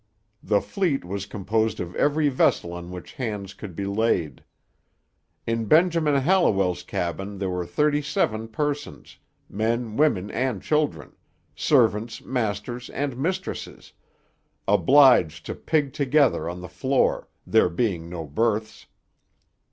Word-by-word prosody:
The 105 -1 +1
fleet 170 - -1
was 100 +2 -5
composed 105 +2 -1
of 90 0 -5
every 150 +1 +2
vessel 125 -9 +1
on 85 0 -7
which 90 -1 -9
hands 105 -6 -4
'could 100 -5 -9
be 100 - -3
laid. 100 -6 0 1.0
In 115 0 -1
Benjamin 160 - +3
Hallowell's 110 - +2
cabin 95 +3 -4
there 95 -1 -2
were 90 -1 -3
thirty 150 - +1
seven 115 - -1
persons 145 - -4 0.3
men, 110 +2 -2
women, 115 -11 +2
and 125 -4 -1
children; 150 - 0 0.4
servants, 115 -5 +2
masters, 120 0 -3
and 140 -2 -3
mistresses 185 +8 -4 0.7
obliged 105 - +5
to - - -4
pig 145 -4 -1
together 140 - +2
on 90 +1 -6
the 90 - -7
floor, 130 +8 0 0.2
there - - +3
being 85 -4 -2
no 85 -2 -5
berths.' 110 +8 -2
110 Hz, 125 wpm, -24 LUFS, 95-140 Hz, 1.0 s, obliged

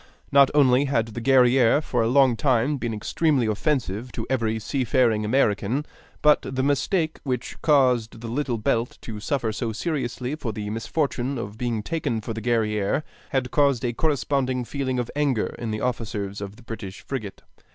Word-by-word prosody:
Not 140 -1 +6
only 135 -1 +5
had 115 -5 0
the 115 +2 -6
Guerrière 130 +1 +4
for 125 -4 0
a 115 - +2
long 130 0 +4
time 130 +2 +1
been 120 -3 -3
extremely 130 +5 +1
offensive 115 -1 -1
to - - -4
every 115 -4 +1
seafaring 120 -2 +1
American, 110 +3 +1 0.4
but 150 0 +5
the 130 0 -3
mistake 155 +4 0
which 125 -2 -4
caused 125 -7 +3
the 115 - -7
Little 125 0 -1
Belt 115 +2 -1
to 110 -2 -7
suffer 115 0 -1
so 115 +1 -2
seriously 125 -1 -3
for 135 -8 -4
the 105 0 -4
misfortune 135 +3 -1
of 105 -3 -5
being 115 -2 -2
taken 155 -6 -2
for 115 +1 -5
the 110 - -5
Guerrière 110 +2 0 0.3
had 130 -2 -1
caused 140 -5 +2
a 120 - 0
corresponding 130 -3 0
feeling 130 -1 -2
of 120 -2 -2
anger 140 -6 0
in 115 - -3
the 110 0 -3
officers 105 -5 -3
of 100 0 -6
the 125 - -17
British 105 -4 -7
frigate. 110 -8 -6
125 Hz, 170 wpm, -24 LUFS, 110-140 Hz, 0.4 s, Not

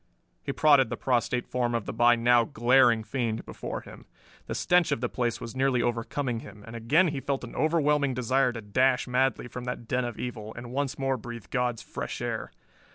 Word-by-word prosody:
He - - -3
prodded 140 -4 +4
the 115 - -4
prostrate 125 -1 0
form 120 -1 -1
of 115 -4 -2
the - - -4
by 120 0 +5
now 120 0 +4
glaring 120 -2 +3
fiend 115 -1 -2
before - - -6
him. - - -13 0.4
The - - -3
stench 180 -1 +3
of - - +1
the 125 - -1
place 120 -2 -1
was 115 - -7
nearly 130 -2 +2
overcoming 120 +1 -2
him, 105 -1 -12
and 115 - -9
again 150 +11 +3
he 145 -2 -3
felt 135 0 -2
an 120 - -8
overwhelming 150 -4 +2
desire 125 +1 +2
to 115 - -6
dash 125 +6 +2
madly 125 -1 +1
from 125 +1 -7
that 125 -2 -5
den 125 +1 0
of 120 -2 -5
evil, 110 -3 -6
and 120 0 -8
once 140 +1 -2
more 135 -1 0
breathe 120 -3 -8
God's 125 -3 -1
fresh - - -5
air. - - -4
125 Hz, 205 wpm, -27 LUFS, 115-135 Hz, 0.4 s, by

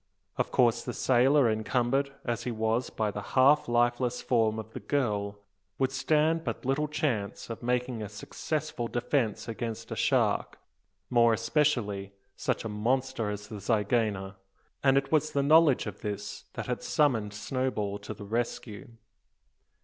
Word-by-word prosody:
Of - - -1
course, 120 -2 +3
the 125 - -5
sailor, 130 +2 +4
encumbered 120 +5 +1
as 120 -2 -1
he 125 - -3
was 110 +2 0
by 110 -2 -1
the 105 - -5
half 135 +7 +4
lifeless 120 +1 +1
form 110 -3 +1
of 110 0 -7
the - - -5
girl, 105 -7 -1 0.4
would 130 -1 +1
stand 155 +5 +2
but - - -4
little 135 +3 +1
chance 125 -9 -2
of 115 - -6
making 125 -1 -1
a 105 - -5
successful 135 +4 -4
defence 120 -2 -1
against 115 -1 -5
a - - -2
shark, - - +1 0.5
more 115 -1 +5
especially 115 -5 0 0.2
such - - -2
a - - -1
monster 115 +1 -1
as 105 0 -5
the 105 -1 -7
zygaena; 105 -2 0 0.5
and 135 -1 +5
it 135 0 0
was 155 -1 +2
the 140 - +2
knowledge 155 -1 +5
of 105 -2 -7
this 105 -2 -5
that - - -4
had - - -3
summoned 115 -9 +1
Snowball 105 -2 -2
to 105 +1 -7
the 100 - -9
rescue. 115 -2 -3
120 Hz, 155 wpm, -29 LUFS, 105-135 Hz, 0.5 s, more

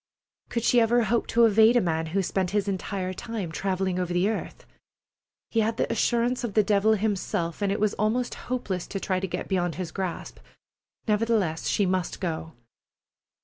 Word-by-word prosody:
Could 235 - -2
she 240 0 +4
ever 235 +1 +3
hope 230 +2 0
to 235 0 +4
evade 220 +2 +5
a - - +6
man 160 -5 -1
who 190 +4 0
spent 185 0 -1
his 205 -1 0
entire 190 -1 -3
time 205 -4 -5
travelling 185 +1 -1
over 180 -1 -2
the 175 +3 +2
earth? 220 - -5 0.9
He 225 - +1
had 225 +1 +1
the - - 0
assurance 240 +1 +1
of 225 -5 -4
the 215 - +5
devil 205 +2 +3
himself, 200 -4 -1
and 200 -1 +1
it 200 - -1
was 210 0 +1
almost 230 +4 0 0.2
hopeless 205 -8 -2
to 195 - -4
try 185 -1 -1
to 190 - -3
get - - -4
beyond 175 -4 0
his 180 -3 -5
grasp. 185 -3 -5 0.7
Nevertheless, 210 -6 +1
she 205 - +2
must 185 -2 -1
go. 165 -2 -4
200 Hz, 185 wpm, -26 LUFS, 185-225 Hz, 0.9 s, a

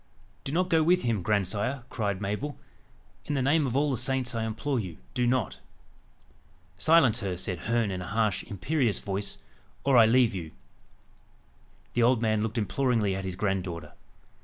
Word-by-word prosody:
"Do 135 - -4
not 180 +4 0
go 160 -1 +5
with 180 +3 +3
him, 115 -5 0
grandsire," 105 +6 -1
cried 100 -5 -1
Mabel. 105 +9 -3 0.7
"In 145 - -1
the 135 - +1
name 145 +2 +3
of 125 +1 -1
all 145 0 +2
the 130 - 0
saints, 125 +1 -1
I 115 -1 -1
implore 125 +4 -2
you, 90 -7 -6 0.2
do 125 -1 +1
not." 125 -6 0 1.2
"Silence 135 - +5
her!" 95 -5 -3
said 90 -1 -3
Herne 115 +1 0
in 90 -1 -4
a 90 - -6
harsh, 110 -1 +1
imperious 115 - 0
voice, 100 0 -3 0.4
"or 135 -2 +4
I 115 -2 +8
leave 120 -1 +4
you." 85 -5 -6 1.4
The 120 - +1
old 120 +1 +4
man 110 -2 +1
looked 110 +2 -2
imploringly 115 -2 +1
at 95 0 -4
his 95 -1 -3
granddaughter. 90 -5 -2
115 Hz, 170 wpm, -28 LUFS, 100-130 Hz, 1.4 s, I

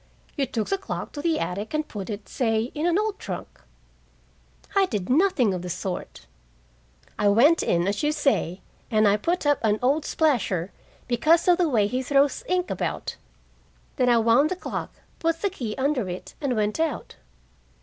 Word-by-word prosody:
" - - -32
you 275 -2 0
took 225 -2 -2
the 390 - 0
clock - - -5
to 290 - -6
the 330 -1 +1
attic 205 +9 -3
and 305 0 -1
put 200 -1 -6
it, 205 -1 -6
say, 225 -2 0
in 305 +3 -1
an 350 +1 +2
old 425 -1 -1
trunk." 175 - -7 1.1
"I 390 -1 +4
did 210 - -3
nothing 275 - +3
of 180 - -3
the 180 - -6
sort. 180 - -5 0.9
I 210 - +3
went 270 +11 +5
in, 170 +1 +1
as 200 0 -1
you 295 - +2
say, 275 - 0 0.3
and 215 -1 +3
I 200 - +4
put 335 - -1
up 290 0 +3
an 215 -1 +3
old 280 +5 +2
splasher, 225 - 0 0.4
because 310 +9 +3
of 355 0 +5
the 345 -3 +3
way 220 -7 +3
he 250 +5 -1
throws 280 - +2
ink 365 0 0
about. - - -3 0.8
Then 250 -3 +3
I 240 - +5
wound 230 +6 +4
the 370 - -1
clock, 365 - -5 0.3
put 330 +1 -1
the 400 - +1
key 235 - -5
under 265 -7 0
it, 180 +1 -7
and 270 -4 0
went 215 +4 0
out." 320 -2 -2
255 Hz, 190 wpm, -25 LUFS, 210-315 Hz, 1.1 s, went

